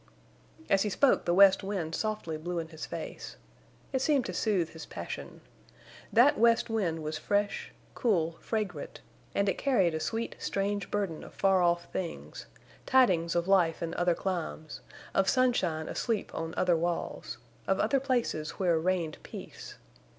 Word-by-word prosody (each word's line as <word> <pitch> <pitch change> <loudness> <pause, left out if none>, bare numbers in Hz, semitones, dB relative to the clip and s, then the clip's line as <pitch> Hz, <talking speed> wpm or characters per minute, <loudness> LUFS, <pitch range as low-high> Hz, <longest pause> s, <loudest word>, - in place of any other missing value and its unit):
As 195 - +3
he 210 - +1
spoke 270 +7 +3
the 175 - +2
west 195 0 +7
wind 190 -5 -3
softly 215 -5 -2
blew 175 +3 -4
in 165 -1 -3
his 160 -1 -7
face. 165 -2 -7 0.6
It 265 - +1
seemed 275 -3 +2
to - - -4
soothe 190 -7 +1
his 160 - -10
passion. - - -7 0.7
That 270 +6 +5
west 230 0 +4
wind 170 -8 -1
was 155 0 -3
fresh, 205 0 -1 0.2
cool, 170 - 0
fragrant, 200 -9 -4 0.3
and 200 - +2
it 195 - 0
carried 195 - +2
a 160 - -1
sweet, 225 +9 -3
strange 200 +1 -2
burden 195 -6 -2
of - - -12
far 195 -1 +3
off 170 0 +2
things—tidings 180 +1 -1
of 170 +1 +1
life 175 -4 +3
in 165 - -3
other 175 -1 +2
climes, 170 -5 -4 0.3
of 195 0 +3
sunshine 190 -12 +1
asleep 230 -3 -2
on 165 0 -4
other 180 -2 +3
walls—of 170 +1 -3
other 275 - +2
places 245 - -1
where 175 -4 +2
reigned 170 -2 -1
peace. - - -9
185 Hz, 150 wpm, -30 LUFS, 165-215 Hz, 0.7 s, west